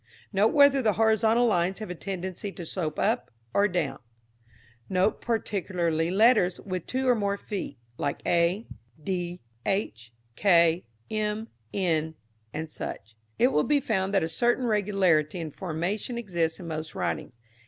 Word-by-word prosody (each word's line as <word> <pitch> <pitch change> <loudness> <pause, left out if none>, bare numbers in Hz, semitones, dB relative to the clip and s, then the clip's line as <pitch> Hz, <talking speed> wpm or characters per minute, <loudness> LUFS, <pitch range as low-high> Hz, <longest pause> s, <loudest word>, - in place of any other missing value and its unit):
Note 200 +2 +4
whether 280 +1 +5
the 215 -4 +3
horizontal 220 +3 +3
lines 185 -4 +1
have 215 -4 -6
a - - -2
tendency 190 +2 -5
to 175 -3 -8
slope 160 -3 -3
up 230 +4 +1 0.2
or 200 +1 +4
down. 175 -7 -2 0.9
Note 190 +3 +1
particularly 180 -7 -1
letters 200 -2 +4
with 185 -3 -5
two 260 +1 -1
or 250 - +6
more 200 -3 0
feet, 195 - -5 0.2
like 140 - -1
a, 175 +6 +2 0.4
d, 175 0 -3 0.2
h, 120 - -2 0.2
k, 170 - +4 0.2
m, 215 +1 -1 0.2
n, 160 -4 0 0.5
&c. 155 - -6 0.5
It 250 - +5
will 150 - +2
be 295 -1 +3
found 195 -7 0
that 195 - +4
a - - 0
certain 240 +9 +1
regularity 190 -7 +2
in 160 -2 -4
formation 190 - -3
exists 170 -8 -1
in 175 - -8
most 160 0 -5
writings. 150 -6 -3
190 Hz, 145 wpm, -27 LUFS, 170-215 Hz, 0.9 s, or